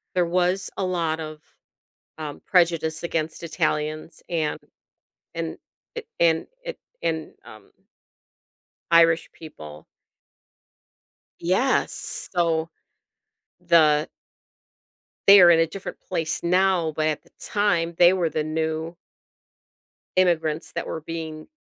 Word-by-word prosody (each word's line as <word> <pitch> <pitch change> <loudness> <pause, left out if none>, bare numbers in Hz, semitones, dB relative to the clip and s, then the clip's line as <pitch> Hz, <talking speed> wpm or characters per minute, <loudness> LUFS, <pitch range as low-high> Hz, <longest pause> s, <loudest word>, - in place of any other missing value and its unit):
there 180 -1 +3
was 180 +2 0
a - - -1
lot 165 -3 -1
of, 155 -1 -7 0.8
um, 150 -2 -6
prejudice 165 -3 +2
against 160 -2 -3
Italians 155 0 -2
and 160 -3 -1 0.7
and 165 -1 -4 0.4
a 470 - -4 0.2
and 165 -1 +3 0.2
a - - -4 0.3
and, 160 -2 -2
um 110 -2 -14 1.2
Irish 165 -1 +4
people. 75 - -11 1.5
Yes. 190 +10 0
So, 165 -2 0 0.9
the 155 -2 +4 1.2
They 200 0 +10
are 175 -1 +8
in 165 -1 +5
a 165 - +3
different 195 +4 -8
place 165 -4 -3
now, 180 -2 +2
but 155 - +1
at 155 -1 -1
the - - -25
time 175 -5 0
they 175 0 +7
were 175 -4 0
the 155 - -1
new 160 +1 -3 1.2
immigrants 165 -4 +1
that - - -3
were 160 - -4
being 160 -1 -6
165 Hz, 110 wpm, -24 LUFS, 155-175 Hz, 1.5 s, They